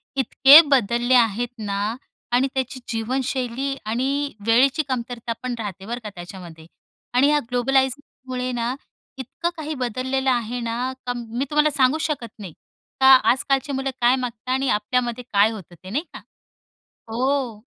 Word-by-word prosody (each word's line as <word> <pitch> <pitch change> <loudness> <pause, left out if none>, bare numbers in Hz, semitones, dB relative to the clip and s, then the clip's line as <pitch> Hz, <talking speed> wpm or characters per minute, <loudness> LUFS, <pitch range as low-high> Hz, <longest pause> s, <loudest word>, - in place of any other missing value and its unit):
इतके 275 +3 +8 0.2
बदलले 240 +1 +1
आहेत 235 0 +3
ना. 205 +1 -2 0.4
आणि 250 +2 +3
त्याची 260 0 -3
जीवनशैली 255 +3 -2
आणि 275 +6 -1
वेळेची 270 +7 +4
कमतरता 240 -2 -3
पण 255 -1 -2
राहते 195 -3 -6
बरं 240 +2 -4
का 210 - -5
त्याच्यामध्ये 175 -2 -10 0.5
आणि 260 +3 +4
या 300 0 +3
ग्लोबलायीजमुळे 255 0 -1
ना 240 +1 -2 0.4
इतकं 265 +7 -3
काही 310 0 -4
बदललेलं 260 +2 -1
आहे 240 0 -2
ना, 240 +2 -3
का 245 - -1
मी 240 +3 -4
तुम्हाला 300 0 +3
सांगू 270 +1 +3
शकत 250 -8 -4
नाही. 190 -6 -8 0.5
का 265 - +5 0.2
आजकालची 275 +2 0
मुलं 270 0 -2
काय 245 +2 +5
मागतात 250 -2 -6
आणि 265 0 0
आपल्यामध्ये 240 +3 -1
काय 205 +2 +4
होतं 185 -5 -10
ते 185 - -9
नाही 275 +10 -1
का? - - -8 0.9
हो. 250 -1 -1
250 Hz, 145 wpm, -22 LUFS, 230-265 Hz, 0.9 s, इतके